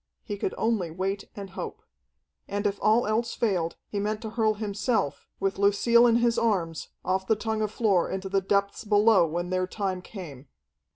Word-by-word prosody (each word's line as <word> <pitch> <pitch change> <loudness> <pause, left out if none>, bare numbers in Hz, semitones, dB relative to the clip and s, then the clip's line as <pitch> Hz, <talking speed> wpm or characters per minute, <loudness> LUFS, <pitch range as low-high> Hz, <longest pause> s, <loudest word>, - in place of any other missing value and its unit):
He 205 - -4
could 195 - -3
only 220 -7 0
wait 190 +4 -3
and 195 -2 -7
hope. - - -6 0.6
And 205 +1 -3
if 200 -1 0
all 220 +3 +4
else 225 +2 0
failed, 180 -7 0
he 205 - -3
meant 210 +1 -1
to 220 - -5
hurl 220 -1 +1
himself, 210 - -1
with 195 0 -1
Lucille 235 +4 +5
in 230 - +4
his 235 0 +3
arms, 180 -8 0 0.2
off 190 +1 0
the 220 - +4
tongue 220 0 -2
of 215 - 0
floor 205 -5 +2
into 190 0 -3
the 195 0 +1
depths 200 +2 0
below 210 -3 +5
when 175 +3 -3
their 185 0 0
time 190 -2 -3
came. 155 - -9
200 Hz, 185 wpm, -27 LUFS, 185-220 Hz, 0.6 s, Lucille